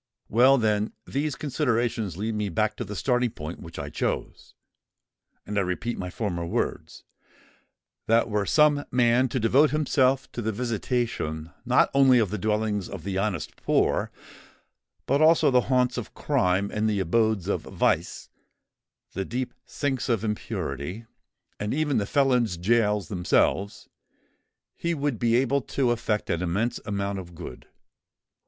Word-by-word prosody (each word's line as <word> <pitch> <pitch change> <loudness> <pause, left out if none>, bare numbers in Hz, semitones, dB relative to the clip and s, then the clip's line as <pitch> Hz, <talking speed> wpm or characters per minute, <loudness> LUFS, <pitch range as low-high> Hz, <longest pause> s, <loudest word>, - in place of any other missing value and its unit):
Well, 130 +5 +5
then, 105 -2 0
these 145 +1 -2
considerations 120 - -1
lead 110 +3 -2
me 105 -1 -2
back 110 +4 0
to - - -3
the 105 -1 -7
starting 125 +3 +1
point 80 -4 -7
which 80 0 -10
I 70 0 -5
chose; - - -4 0.9
and 105 0 -1
I - - +3
repeat 95 +6 -2
my 90 - -5
former 90 -3 -3
words,—that 115 +6 -4
were 105 -2 0
some 150 -2 +4
man 125 +1 +3
to 130 - -1
devote 130 +7 +4
himself 135 -3 +2
to 120 - -5
the 110 0 -1
visitation 110 -8 -2
not - - +3
only 135 -2 +6
of 110 -5 +1
the 105 - -3
dwellings 105 -1 -1
of 95 -5 -7
the 95 0 -2
honest 95 -6 -2
poor, - - +1 1.0
but 140 +3 +2
also 160 -2 +5
the 125 -1 +5
haunts 125 -1 +2
of 115 - -9
crime, 100 -8 +1
and 110 +1 +1
the 105 -2 0
abodes 110 +1 +1
of - - 0
vice, - - -1 0.9
the 95 - -2
deep 125 +5 -4
sinks 135 -4 -2
of 115 -4 +1
impurity, 100 - -4 0.5
and 105 +4 -2
even 150 -2 +1
the 100 - -2
felons' 125 -9 +2
gaols 105 0 +1
themselves, 95 +2 0 0.9
he 170 0 -2
would 145 -5 -2
be 115 -1 +2
able 135 +2 +2
to 125 +1 0
effect 115 -3 -1
an 85 - -1
immense 100 +7 -1
amount 100 -1 -2
of 85 -2 -10
good. 80 -7 -9
110 Hz, 150 wpm, -26 LUFS, 100-125 Hz, 1.0 s, only